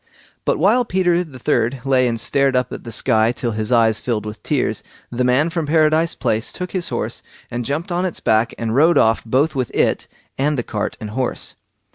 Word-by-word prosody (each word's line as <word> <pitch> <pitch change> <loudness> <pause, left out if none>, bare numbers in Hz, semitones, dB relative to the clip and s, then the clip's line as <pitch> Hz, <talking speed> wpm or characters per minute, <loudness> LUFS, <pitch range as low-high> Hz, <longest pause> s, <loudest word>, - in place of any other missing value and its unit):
But - - +1
while 215 +9 +3
Peter 180 -4 +1
the 145 -7 -12
third 120 +1 0
lay 130 -2 +3
and 115 -1 -1
stared 135 +3 +1
up 125 -1 0
at - - -8
the 115 - -6
sky 110 0 +3
till 120 -1 -3
his 110 +1 -3
eyes 115 -2 +3
filled 110 -4 -2
with 105 0 -7
tears, - - -1 0.3
the 120 +1 -1
man 130 +6 +2
from 165 -3 -2
Paradise 155 +1 +3
Place 110 +2 -1
took 180 -1 -6
his 185 -3 -3
horse - - -3 0.3
and 120 +1 -3
jumped 155 - -3
on 175 +1 0
its 185 -3 -3
back 110 +1 +2
and 115 -1 -2
rode 155 +5 +4
off 110 -3 +3
both 135 +7 +1
with 130 -4 -2
it - - +1 0.3
and 145 +2 +1
the 120 - -1
cart 105 -2 -3
and 105 -2 -6
horse. 130 +2 -2
130 Hz, 210 wpm, -20 LUFS, 115-160 Hz, 0.3 s, rode